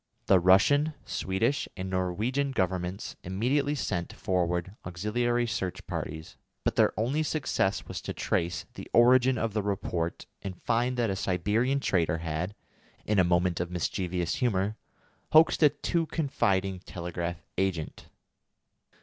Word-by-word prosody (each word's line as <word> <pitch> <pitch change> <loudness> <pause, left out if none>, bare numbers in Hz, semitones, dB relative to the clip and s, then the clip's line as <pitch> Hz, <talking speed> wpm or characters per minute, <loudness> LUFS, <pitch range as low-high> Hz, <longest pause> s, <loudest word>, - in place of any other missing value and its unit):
The 95 - +5
Russian, 145 - +4
Swedish, 115 +9 -1
and 95 0 -4
Norwegian 105 +10 -1
Governments 95 -2 -2
immediately 130 +11 0
sent 90 - -2
forward 90 +1 -1
auxiliary 120 +7 0
search 95 -5 -3
parties, 80 +1 -5 0.3
but - - 0
their - - +4
only 130 +8 +1
success 135 -10 0
was - - -5
to - - -5
trace 85 +1 -1
the - - -9
origin 125 +1 +5
of 115 -1 -1
the 105 - +1
report, 90 -4 -2 0.2
and 95 -2 -6
find 120 +2 +1
that 115 -4 +1
a - - -1
Siberian 105 +9 +1
trader 85 - +1
had, 80 +4 -3 0.5
in 105 -2 +2
a - - +6
moment 90 0 +2
of 90 0 -2
mischievous 90 0 -1
humour, 105 -4 0 0.6
hoaxed 160 +2 +6
a 150 - +8
too 165 +3 -1
confiding 100 - 0
telegraph 85 -2 -5 0.2
agent. 95 -5 -2
95 Hz, 135 wpm, -28 LUFS, 90-120 Hz, 0.6 s, a